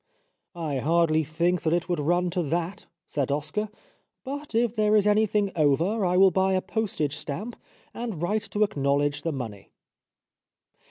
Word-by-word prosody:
'' - - -54 0.2
I 135 - -1
hardly 160 +2 +2
think 170 +4 0
that 160 - +1
it 175 0 0
would 175 -3 -1
run 175 +4 +1
to 180 0 0
that," 170 +6 -3 0.2
said 140 -2 -2
Oscar, 150 +9 -2 0.5
"but 285 -2 -6
if 235 0 +2
there 215 -1 +3
is 210 -1 +4
any 210 +1 +4
thing 205 -1 0
over 165 +8 +2
I 180 0 +2
will 190 0 +7
buy 190 +2 +2
a 185 - +3
postage 185 -9 -2
stamp 180 +11 -5 0.4
and 230 -8 -5
write 205 +6 -1
to 210 - +1
acknowledge 145 -6 0
the 165 - -2
money." 115 -8 -6
175 Hz, 170 wpm, -26 LUFS, 150-210 Hz, 0.5 s, will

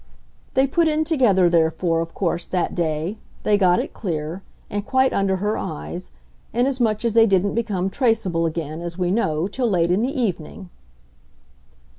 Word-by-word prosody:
They 265 +1 +4
put 330 +5 +2
in 310 0 +1
together, 245 - +3
therefore, 165 0 +2
of 165 0 -4
course, 175 -2 -1
that 180 -2 -1
day; 165 +4 -2 0.2
they 210 - +3
got 185 -3 +4
it - - -4
clear 165 -2 -4 0.3
and 205 0 -3
quite 260 +4 +2
under 195 -1 +1
her 205 +3 -1
eyes; 75 -4 -6 0.4
inasmuch 240 -3 +1
as 230 - +1
they 225 0 +6
didn't 195 0 +2
become 210 -5 -1
traceable 195 -9 +1
again, 160 0 -4
as 170 0 -6
we 180 -1 0
know, 165 -6 0
till 240 +3 -1
late 175 -3 +2
in 185 +4 +2
the 265 +4 -1
evening." 185 -3 -3
190 Hz, 165 wpm, -22 LUFS, 170-230 Hz, 0.4 s, they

